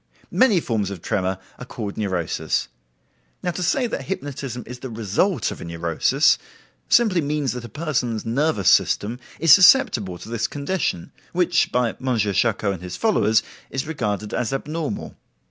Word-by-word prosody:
Many 235 -8 +4
forms 110 - -1
of 95 -4 -8
tremor 95 -3 -1 0.2
are 125 - -7
called 105 -5 -6
neurosis. 95 -6 -1 0.7
Now 180 - 0
to 175 - -5
say 245 +9 +1
that 230 - -4
hypnotism 135 -8 -5
is 125 +1 -9
the 130 - -7
result 115 - 0
of - - -8
a - - -5
neurosis, 85 -1 +2 0.5
simply 215 -8 +4
means 145 -2 -1
that 125 -1 -6
a - - -9
person's 125 -6 -2
nervous 115 -4 0
system 110 +4 +3 0.2
is 165 -3 +7
susceptible 175 - +5
to - - -11
this 115 0 -1
condition, 145 - -2 0.2
which, 175 0 +2
by 125 -1 +2
M. 130 -2 +1
Charcot 100 0 +1
and 90 - -8
his 90 0 -6
followers, 115 - +3 0.3
is 135 - -3
regarded 105 -8 -3
as 120 - -1
abnormal." 150 +3 -4
125 Hz, 160 wpm, -22 LUFS, 105-160 Hz, 0.7 s, is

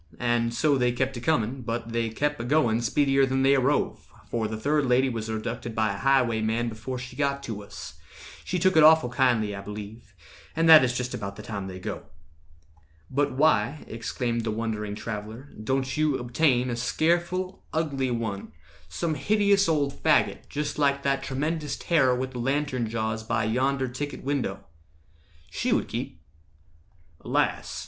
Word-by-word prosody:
And 120 -1 +1
so 140 +3 +2
they 125 -1 +3
kept 130 +2 -1
a - - -6
comin', 130 -3 0
but 115 0 -4
they 115 -1 0
kep' 145 +6 -1
A - - -3
going 120 -4 +2
speedier 135 +2 +2
than 135 0 +1
they 135 +1 +5
arrove, 135 +2 +1 0.3
For 115 -2 -1
the 110 0 -4
third 145 +4 +1
lady 130 +2 +3
was 115 -2 -4
abducted 115 +1 -4
by 110 -2 +1
A - - -6
highwayman 120 -3 +2
before 115 +4 -6
she 125 0 -8
got 140 -1 -1
to 110 -5 -5
us— 100 - -10 0.4
She 180 - -2
took 185 0 +2
it 160 - +7
awful 155 -4 +6
kindly, 120 -5 +1
I 100 - -6
believe. 105 +1 -9 0.4
And 165 0 +2
that 160 -3 +10
is 125 0 0
just 125 0 -3
about 100 -2 -5
the 105 - -10
time 100 -3 -5
they 95 -1 -7
go." 105 +1 -6 1.0
"But 140 0 +1
why," 140 -1 +2
exclaimed 115 +1 -3
the 110 - -2
wondering 105 -2 -3
traveller, 110 +5 -6
"Don't 130 +2 -1
you 155 -2 +1
obtain 125 0 +1
a - - -1
scareful, 175 +8 0
ugly 140 -5 -1
one— 110 -8 -4 0.4
Some 160 - -2
hideous 200 +5 +2
old 145 -3 +1
faggot, 155 +1 +1
just 150 0 -3
like 140 -1 +2
that 135 0 +1
Tremendous 150 +3 -2
terror 135 -7 +2
with 130 +1 -3
the 125 - -6
lantern 130 -2 -1
jaws 110 0 -2
By 110 0 -1
yonder 130 +4 0
ticket 130 +3 -5
window? 140 -1 -2 0.9
She - - -1
would - - +1
keep." - - -5 1.0
"Alas! - - 0
125 Hz, 170 wpm, -26 LUFS, 115-145 Hz, 1.0 s, that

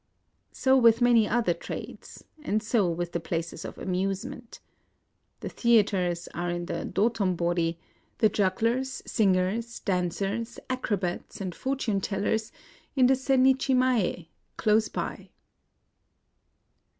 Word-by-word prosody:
So 265 0 +2
with 235 -3 +5
many 240 -3 +4
other 225 -6 +1
trades; - - -8 0.2
and 215 -7 -1
so 215 -4 +2
with 175 +1 -3
the 170 - -2
places 165 0 -4
of - - -8
amusement. 195 +5 -3 0.8
The - - -4
theatres 195 -7 +2
are 175 0 -2
in 175 0 -3
the - - -4
Dotombori; 175 -6 0 0.4
the 220 - +5
jugglers, 230 +7 0
singers, 205 +3 0
dancers, 195 +5 -2
acrobats, 200 -8 -3
and 185 -3 -4
fortune 245 -4 -1
tellers 215 +3 -1 0.4
in 260 -2 +5
the 260 - +5
Sennichi 265 0 +3
mae, 235 -10 +1 0.3
close 215 0 +3
by. - - -5
210 Hz, 115 wpm, -27 LUFS, 180-235 Hz, 0.8 s, with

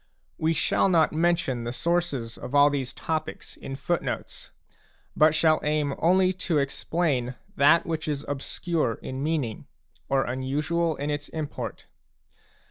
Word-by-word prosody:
We 160 +1 +2
shall 180 - +2
not 165 -4 +3
mention 165 -6 +1
the 120 - -3
sources 145 -6 -1
of 135 - -6
all 145 0 +6
these 135 -3 -2
topics 155 +1 -4
in 135 - -7
footnotes, 175 +5 -3 0.7
but 155 0 +5
shall 160 -1 +4
aim 150 -1 0
only 185 +2 +4 0.2
to 160 - +3
explain 140 -2 0 0.2
that 150 +5 +5
which 160 -2 -3
is 145 -1 -2
obscure 145 -1 -1
in 130 +1 -5
meaning 145 -7 -2 0.4
or 135 0 +3
unusual 150 +6 -1
in 145 +2 -3
its 145 0 -4
import. 155 -2 -5
150 Hz, 135 wpm, -26 LUFS, 135-165 Hz, 0.7 s, all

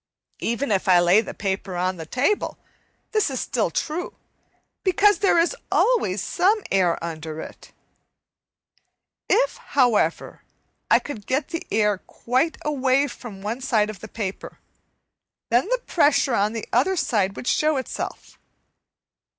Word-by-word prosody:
Even 235 +2 -1
if 195 -1 +1
I 180 -2 +6
lay 175 +5 +5
the 225 - -8
paper 190 -1 -3
on 185 +1 -1
the 160 -1 -8
table 280 - 0 0.5
this 430 -7 +2
is 265 - -3
still - - 0
true, 330 +2 -3 0.7
because 410 +2 +4
there 390 -4 +3
is 340 +8 +2 0.2
always 210 - +2
some 405 +4 +2
air 180 -3 +2
under 160 -1 -5
it. - - -10 1.6
If, - - +2
however, 235 - +1 0.5
I - - +7
could 220 -9 -7
get 270 +2 0
the 330 -1 -5
air 210 -2 +2
quite 260 +12 -1
away 275 -2 +2
from 215 -8 -9
one 225 +5 -3
side 220 -5 +1
of 205 - -13
the 220 - -9
paper, 200 -3 -6 0.9
then 245 - +3
the - - 0
pressure 285 -5 +3
on 210 0 +1
the 225 -2 -4
other 270 +12 +3
side 205 - 0
would - - -7
show 305 +3 +2
itself. 260 - -6
240 Hz, 140 wpm, -23 LUFS, 195-310 Hz, 1.6 s, I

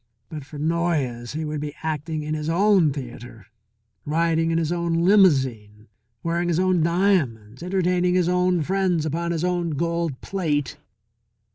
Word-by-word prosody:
But 155 -3 -7
for 150 +2 -11
Noyes 150 -7 -1
he 155 +1 -3
would 150 -1 -4
be 150 0 -5
acting 155 0 -3
in 155 +1 -3
his 155 0 -3
own 185 -2 +3
theatre, 120 -5 -9 0.6
riding 165 +1 +1
in 165 - +1
his 165 -1 0
own 170 -1 0
limousine, 130 - +2 0.3
wearing 170 +1 -1
his 170 -1 +1
own 185 -2 +2
diamonds, 155 - 0
entertaining 180 0 +1
his 180 -2 +2
own 180 -1 +2
friends 180 -2 0
upon 170 +3 -2
his 165 -1 -2
own 175 -1 0
gold 170 -3 -1
plate. 155 -8 -2
165 Hz, 150 wpm, -23 LUFS, 145-175 Hz, 0.6 s, own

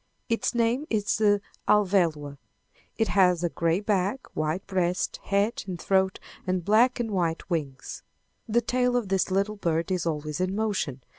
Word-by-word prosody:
Its 230 +1 0
name 240 +5 +1
is 215 -1 0
the 205 -2 +3 0.3
Alvéloa. 170 -9 +2 0.6
It 225 - +1
has 180 -3 +3
a 175 - +1
gray 165 +2 0
back, 205 +4 -1
white 155 +4 -1
breast, 180 -1 -1
head 200 +3 0
and 180 -2 -5
throat, 190 +1 +1 0.3
and 185 -2 -1
black 235 +5 +4
and 230 -2 -2
white 170 -4 -1
wings. 140 -6 -4 0.5
The 235 +2 +3
tail 250 +1 +1
of 225 -6 -2
this 195 0 +1
little 200 +3 0
bird 170 -1 -1
is 180 -2 0
always 150 0 -3
in 185 +1 0
motion. 200 - -2
190 Hz, 160 wpm, -26 LUFS, 170-215 Hz, 0.6 s, black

